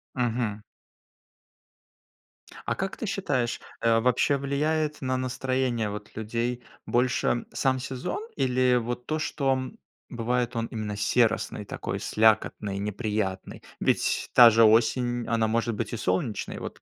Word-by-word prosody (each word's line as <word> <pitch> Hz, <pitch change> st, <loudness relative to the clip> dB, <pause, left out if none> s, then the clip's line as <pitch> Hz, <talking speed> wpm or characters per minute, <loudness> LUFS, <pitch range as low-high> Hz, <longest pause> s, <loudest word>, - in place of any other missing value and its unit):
Мгм. 115 Hz, -4 st, -1 dB, 2.1 s
А -, -, 0 dB
как 190 Hz, 0 st, -3 dB
ты -, -, -4 dB
считаешь, 145 Hz, -, -1 dB, 0.2 s
э, 115 Hz, 0 st, +3 dB
вообще 125 Hz, +3 st, +2 dB
влияет 150 Hz, +2 st, -1 dB
на 130 Hz, 0 st, -1 dB
настроение 130 Hz, -3 st, -1 dB
вот 105 Hz, 0 st, -8 dB
людей 120 Hz, +3 st, -2 dB, 0.2 s
больше 120 Hz, -1 st, +1 dB
сам 130 Hz, -1 st, +1 dB
сезон 130 Hz, -, -4 dB, 0.2 s
или 125 Hz, -1 st, +2 dB
вот 120 Hz, +1 st, -2 dB
то, 155 Hz, 0 st, -1 dB
что, 140 Hz, -3 st, 0 dB
м, 130 Hz, 0 st, -4 dB, 0.3 s
бывает 120 Hz, 0 st, -1 dB
он 115 Hz, -, 0 dB
именно 105 Hz, -3 st, -5 dB
серосный, 110 Hz, -1 st, +1 dB
такой -, -, -5 dB
слякотный, 105 Hz, -2 st, +2 dB
неприятный? 105 Hz, -2 st, -3 dB, 0.2 s
Ведь -, -, 0 dB
та 120 Hz, -2 st, +10 dB
же 115 Hz, 0 st, +5 dB
осень, 120 Hz, +2 st, +3 dB
она 115 Hz, -1 st, +1 dB
может 115 Hz, 0 st, 0 dB
быть -, -, -4 dB
и -, -, -2 dB
солнечной. 100 Hz, +3 st, -2 dB
Вот -, -, -8 dB
120 Hz, 130 wpm, -27 LUFS, 110-130 Hz, 2.1 s, та